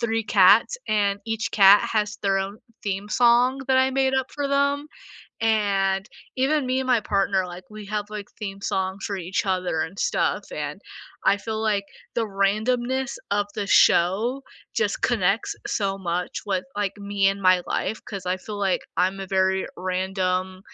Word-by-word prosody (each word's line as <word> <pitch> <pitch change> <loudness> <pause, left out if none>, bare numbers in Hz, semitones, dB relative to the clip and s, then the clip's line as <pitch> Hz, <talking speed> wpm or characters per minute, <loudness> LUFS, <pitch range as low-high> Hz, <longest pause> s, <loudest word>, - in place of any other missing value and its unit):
3 225 -1 0
cats 205 - +5
and 205 -1 +1
each 225 0 -2
cat 200 -1 +7
has 210 -1 0
their 195 -1 +2
own 195 +2 -4 0.2
theme 200 -1 -3
song 245 +4 +3
that 260 - +4
I 260 0 +4
made 265 0 +1
up 265 0 -1
for 285 -1 -2
them, 280 +1 +1 0.5
and 200 -3 +1 0.3
even 270 +2 +1
me 255 +1 0
and 265 - -3
my 250 -3 +3
partner, 195 -2 0
like, 180 +1 -9
we 215 -1 -9
have, 205 0 -3
like, 210 -1 -6
theme 195 -2 -6
songs 190 0 -2
for 200 - -3
each 185 +2 -2
other 185 -4 0
and 180 +5 -4
stuff - - 0
and - - -5 0.4
I 200 - +4
feel 220 +1 -4
like, 210 -2 +1 0.3
the 230 -1 0
randomness 240 +6 0
of 205 0 +1
the 205 -2 -3
show 215 +10 +3 0.3
just 210 -2 0
connects 205 -2 +1
so 195 -2 -1
much 175 -1 -3
with, 190 -3 -1
like, 205 -1 -2
me 200 -1 +1
and 195 0 -2
my 185 -1 +4
life 220 - -2
'cause 195 -3 -7
I 180 +1 0
feel 205 +2 -8
like 195 -2 +1 0.2
I'm 190 +2 +1
a 195 - -5
very 190 0 +1
random, 185 0 -2
200 Hz, 175 wpm, -24 LUFS, 190-225 Hz, 0.5 s, cat